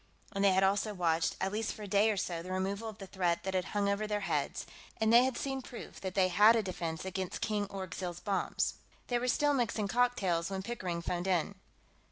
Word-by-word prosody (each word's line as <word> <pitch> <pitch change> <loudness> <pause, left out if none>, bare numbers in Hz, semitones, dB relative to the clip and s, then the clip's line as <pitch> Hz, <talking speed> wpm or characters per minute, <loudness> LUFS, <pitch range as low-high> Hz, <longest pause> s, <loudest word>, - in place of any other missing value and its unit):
And 195 -1 0
they 195 -1 +6
had 190 +1 +3
also 200 +2 +1
watched, 165 -2 +1
at 190 +1 0
least 215 +1 -1
for 215 - -8
a - - -6
day 205 +2 +4
or 210 - 0
so, 170 -3 -2
the 185 +2 -7
removal 195 +4 -2
of 215 - -10
the 200 - -8
threat 180 -3 0
that 190 - -2
had 185 -1 +1
hung 205 -1 0
over 200 +1 0
their 210 -1 -1
heads. 150 -7 -1 0.3
And 220 +1 +3
they 240 +2 +8
had 260 -2 -1
seen 270 -1 -2
proof 240 -1 -9
that 190 -1 -4
they 185 -2 +4
had 210 +5 +7
a 225 - +2
defense 170 -3 -4
against 190 -1 -4
King 210 -1 0
Orgzild's 185 -2 -5
bombs. 200 -1 0 0.4
They 245 -1 +2
were 250 - -2
still 290 +3 +3
mixing 230 -5 0
cocktails 195 -8 +1
when 190 -1 -3
Pickering 185 -7 -3
phoned 175 +1 -2
in. 185 +1 +1
195 Hz, 230 wpm, -32 LUFS, 185-215 Hz, 0.4 s, they